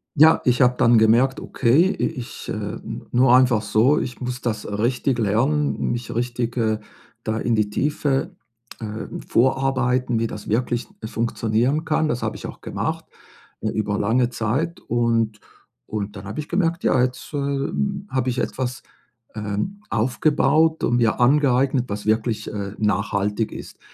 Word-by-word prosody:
Ja, 155 +2 +6
ich 125 0 +3
habe 125 -1 +4
dann 120 0 +5
gemerkt: 120 +5 +4
„Okay, 140 +9 +3
i - - 0
ich, 130 -7 -6
äh, - - -4 0.3
nur 125 0 +5
einfach 125 -4 +4
so, 110 +7 +3
ich 125 - -5
muss 125 0 -4
das, 110 -3 -2
äh, 105 - -6
richtig 120 +4 0
lernen, 130 +8 +1
mich 120 -2 -4
richtig, 120 0 -2
äh, 110 -2 +1 0.4
da 110 0 -1
in 115 0 0
die 105 -1 +1
Tiefe, 145 - -1 0.4
ähm, 110 -1 -6
vorarbeiten, 130 -1 +1
wie 115 - 0
das 105 - -8
wirklich 120 +2 0 0.2
funktionieren 115 +5 0
kann.“ 155 0 +1
Das 125 -5 -2
habe - - -2
ich - - -8
auch - - -10
gemacht, - - -3 0.6
äh, 110 - -1
über 105 -1 -1
lange 120 +4 +2
Zeit 125 +9 -2
und 115 -2 0 0.5
und 105 -1 -4
dann 95 0 -8
habe 100 +9 -6
ich 150 - -5
gemerkt: 170 -2 0
„Ja, 130 - +3
jetzt, 125 +4 -2
ähm, 145 +8 -2
habe 130 -1 0
ich 125 +1 -2
etwas, 125 0 -3 0.5
ähm, 105 - -3
aufgebaut 150 +6 +2
und 120 - +2
mir 115 -3 +2
angeeignet, 130 -1 +3
was 105 0 -4
wirklich, 110 +1 0
äh, 100 -2 -4
nachhaltig 105 +1 0
ist.“ - - -9
120 Hz, 160 wpm, -22 LUFS, 110-135 Hz, 0.6 s, Ja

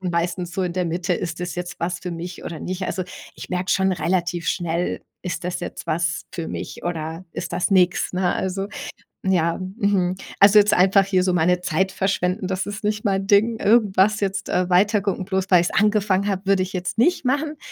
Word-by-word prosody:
meistens 175 0 -2
so 190 - -1
in 180 -2 -1
der 180 0 -1
Mitte, 175 +2 -1
ist 170 -1 -4
das 180 0 -4
jetzt 175 0 -6
was 170 +1 -2
für 180 - -5
mich 170 +1 -7
oder 165 - -5
nicht? 185 +3 -5
Also, 185 - -2 0.3
ich - - -9
merke 180 +1 -1
schon 190 0 +2
relativ 175 -1 -1
schnell, 170 -1 -1 0.2
ist 180 -1 -4
das 180 0 -3
jetzt - - -7
was 160 +1 -1
für 165 -2 -4
mich - - -6
oder 165 0 -4
ist - - -6
das 180 - 0
nix, 180 -2 +3
ne? 180 -1 +1
Also, 190 +1 -2 0.6
ja. 170 -3 +1 0.2
Mhm. 195 -4 +1 0.2
Also, 200 +1 +7
jetzt 210 0 +6
einfach 195 +2 +5
hier 190 -2 +2
so 185 -1 +1
meine 180 +1 +2
Zeit 185 +2 0
verschwenden, 190 0 -1
das 190 0 -2
ist 205 +1 -6
nicht 210 +1 -1
mein 195 -1 0
Ding. 220 +2 +3
Irgendwas 210 -1 +3
jetzt, 200 +1 -2
äh, 180 0 +1
weitergucken 200 0 +2
bloß 190 -1 -1
weil 180 -2 +7
ich 175 - 0
es - - -10
angefangen 205 -2 +2
habe, 195 -1 -2
würde 195 -1 +3
ich 185 - -7
jetzt 185 +2 -3
nicht 335 +7 +2
machen. 295 +4 0
185 Hz, 205 wpm, -22 LUFS, 175-200 Hz, 0.6 s, Also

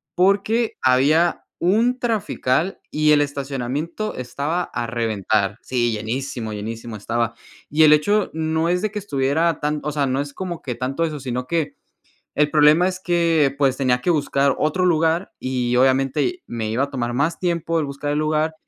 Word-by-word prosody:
porque 200 +5 +2
había 145 +7 +3
un 230 +8 +2
trafical 195 - -1
y 150 0 +3
el 145 -1 +5
estacionamiento 145 - -3
estaba 145 +7 -2
a 120 -7 -4
reventar 110 -3 0
Sí, 120 -2 0
llenísimo, 115 +1 -4
llenísimo 110 +2 -6
estaba 115 +2 -2 0.3
y 155 +2 +4
el 150 0 +8
hecho 205 +7 +2
no 160 +1 0
es 180 +1 +1
de 215 - 0
que 210 - -6
estuviera 155 -1 0
tan 150 0 -1
o 150 - -2
sea, 145 -1 0
no 135 +2 0
es 145 -1 -7
como 180 -3 -5
que 125 - -3
tanto 135 +7 -2
eso, 155 -2 -4
si 130 -2 -5
no 125 +1 -2
que 165 -1 -1 0.6
el 150 0 +3
problema 155 +4 +5
es 185 0 -5
que 170 -5 +2
pues 135 -2 +2
tenía 125 -2 +1
que 175 - 0
buscar 140 -3 +2
otro 180 +4 +1
lugar 165 +2 +1
y 125 -1 -1
obviamente 135 - +2
me 110 -2 -4
iba 125 +5 +1
a 140 - -8
tomar 120 -2 -3
más 150 +6 0
tiempo 170 -2 0
el 150 - -2
buscar 140 +1 -4
el 150 - 0
lugar 155 +1 0
145 Hz, 180 wpm, -21 LUFS, 130-170 Hz, 0.6 s, el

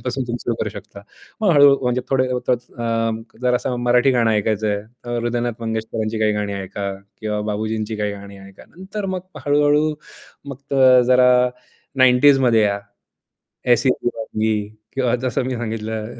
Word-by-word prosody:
गाण्यांपासून 130 +1 -3
तुम्ही 120 0 -3
सुरु 120 - 0
करू 105 - -1
शकता. 100 0 -11 0.4
मग 210 - +3
हळू 140 -1 +7
म्हणजे 125 0 0
थोडे 130 -1 +2 1.2
जरा 125 0 +3
असं 125 0 -3
मराठी 125 +2 +3
गाणं 115 -2 +2
ऐकायचं 105 0 0
आहे, 105 - +1 0.3
अ, 120 - -6
हृदयनाथ 120 0 -2
मंगेशकरांची 110 0 -3
काही 105 -1 +3
गाणी 105 -1 -2
ऐका 100 +1 -5 0.3
किंवा 105 -1 -2
बाबुजींची 110 +1 -3
काही 105 -1 -2
गाणी 100 0 -10
ऐका. 95 0 -14
नंतर 195 +3 -7
मग 185 - -3 0.3
हळू-हळू 150 +1 +3 0.6
मग 140 +1 -6 0.3
जरा 125 0 +5 0.7
90s 130 +2 +6
मध्ये 115 -2 +4
या. 100 -1 +1 1.0
एसी 130 +3 +1
दीवानगी 110 -3 -1 0.4
किंवा 125 -2 +1
जसं 125 0 -2
मी 130 -1 -2
सांगितलं, 110 -1 -4
120 Hz, 150 wpm, -20 LUFS, 110-130 Hz, 1.2 s, हळू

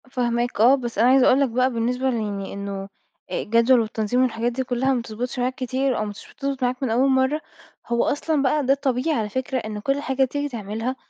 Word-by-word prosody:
فاهماك، 240 -3 -1
آه، 250 +4 +7
بس 240 -4 -5
أنا 235 +4 +5
عايزة 260 0 +5
أقول 260 - +5
لك 275 - +2
بقى 255 +3 +1
بالنسبة 250 +3 0
ليعني 205 -5 -3
إنه 200 -1 -5 0.4
الجدول 230 +3 +3
والتنظيم 220 +2 0
والحاجات 240 -1 0
دي 260 +2 -2
كلها 260 +1 0
ما 250 - 0
بتضبطش 235 +2 -5
معاك 250 +1 0
كتير 260 0 -1
أو 215 - -1
مش 205 -1 -8
بتضبط 275 -2 -3
معاك 250 +2 -1
من 260 - 0
أول 250 +5 +3
مرّة، 265 +3 +2 0.5
هو 235 0 +1
أصلًا 300 0 0
بقى 280 +1 +1
ده 270 - +4
الطبيعي 275 +2 0
على 210 -1 -2
فكرة، 260 +4 -2
إن 215 -2 -5
كل 275 +6 -1
حاجة 265 -1 +1
تيجي 285 +3 -3
تعملها 225 +1 -4
250 Hz, 210 wpm, -23 LUFS, 230-265 Hz, 0.5 s, آه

